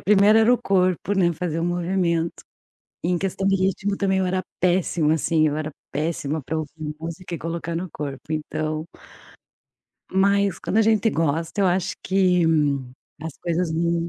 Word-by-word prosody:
primeira 210 +2 +5
era 225 +2 +5
o - - -2
corpo, 185 +1 +1
né, 175 -2 +3
fazer 165 0 -3
o - - 0
movimento. 175 -1 0 0.6
Em 175 +1 +1
questão 195 +1 -1
de 195 - +4
ritmo 195 +1 0
também, 190 -1 +1
eu 190 - +1
era 185 0 0 0.2
péssimo 175 -3 +2
assim, 160 0 +2
eu 150 0 -1
era 155 0 -3 0.2
péssima 155 0 -2
para 160 - -2
ouvir 155 0 -5
música 170 +2 -6
e - - -6
colocar 165 0 -4
no 175 +2 -3
corpo, 145 +1 -6
então. 155 0 -2 1.3
Mas 200 0 +2
quando 215 - -1
a - - +6
gente 220 0 +3
gosta, 165 +4 -1
eu 195 - +4
acho 180 0 0
que 185 -2 +3 0.8
as 160 -2 -6
coisas 170 0 0
não 170 +1 0
175 Hz, 165 wpm, -23 LUFS, 160-190 Hz, 1.3 s, a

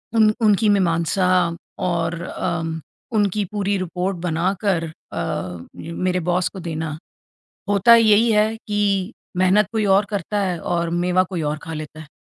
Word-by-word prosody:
उन 215 -1 +5
उनकी 210 +1 +4
मीमांसा 180 -1 +2 0.6
और 170 0 -1
अ, 170 -2 -3 0.5
उनकी 205 0 +1
पूरी 200 -1 0
रिपोर्ट 185 +1 -2
बनाकर 175 +1 0
अ, 90 - -5 0.2
मेरे 180 +2 -2
बॉस 180 0 +1
को 190 - -9
देना। 160 -2 -4 0.7
होता 205 +4 +6
यही 225 0 +5
है 215 +1 +2
कि 205 -1 -1 0.2
मेहनत 185 +2 +4
कोई 220 -2 0
और 205 - +1
करता 205 +1 -2
है 180 -3 -2
और 170 -1 0
मेवा 180 +2 +2
कोई 175 -4 -3
और 155 - -3
खा 160 - -6
लेता 155 0 -7
है। 155 - -12
185 Hz, 145 wpm, -21 LUFS, 170-205 Hz, 0.7 s, होता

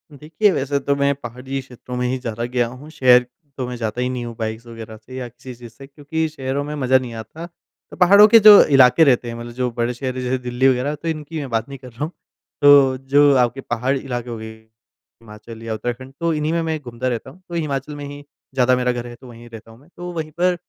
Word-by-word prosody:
देखिए, 160 +9 +1
वैसे 140 -3 -1
तो 140 +1 0
मैं 140 0 +2
पहाड़ी 130 +1 -6
क्षेत्रों 125 -1 -10
में 125 0 0
ही 130 +1 -1
ज़्यादा 115 -2 -5
गया 120 -1 0
हूँ। 130 +6 -11
शहर 125 -5 +4 0.3
तो 130 -2 -3
मैं 125 - -5
जाता 115 0 -3
ही 125 - 0
नहीं 125 -1 -4
हूँ 115 -1 -7
बाइक्स 110 +1 -4
वग़ैरह 115 -1 -10
से 120 +4 -13
या 125 -1 -5
किसी 125 +2 -11
चीज़ 120 -1 -12
से। 135 +3 -13
क्योंकि 160 +3 -3
शहरों 140 -2 -3
में 150 +1 -6
मज़ा 130 -2 +3
नहीं 125 -2 -5
आता, 115 +9 -8
तो 175 - -19
पहाड़ों 200 +4 +7
के 230 +1 +7
जो 210 -1 +10
इलाके 135 +2 +5
रहते 125 -4 +3
हैं, 115 - -5
मतलब 120 0 -8
जो 125 0 -1
बड़े 120 +1 -2
शहर 130 +1 -4
जैसे 125 +1 -1
दिल्ली 125 +1 0
वग़ैरह, 130 +3 +1
तो 160 +3 -8
इनकी 155 0 -4
मैं 140 -3 -5
बात 115 +1 -1
नहीं 140 - -8
कर 125 -1 -11
रहा 120 +6 -6
हूँ। 160 - -3 0.5
तो 140 -2 +6
जो 140 +2 +4
आपके 125 +2 +1
पहाड़ 125 +3 -1
इलाके 125 -2 -5
हो 115 - -5
गए 110 0 -8 0.7
हिमाचल 110 +1 -12
या 115 -1 -4
उत्तराखंड 120 +4 -5
तो 170 -1 0
इन्हीं 150 +1 -1
में 170 - 0
मैं 160 -1 -2
घूमता 125 -2 -5
रहता 120 +1 -3
हूँ। 180 +8 -17
तो 170 - -6
हिमाचल 150 -2 -3
में 145 0 -7
ही 145 0 -9 0.3
ज़्यादा 130 -1 +3
मेरा 125 0 0
घर 120 0 -5
है, 120 - -10
तो 130 +1 -15
वहीं 120 0 -13
रहता 115 0 -12
हूँ 115 - -17
मैं। 145 +6 -23
तो 175 0 -6
वहीं 155 -2 -5
पर 180 0 +2
130 Hz, 250 wpm, -20 LUFS, 120-145 Hz, 0.7 s, जो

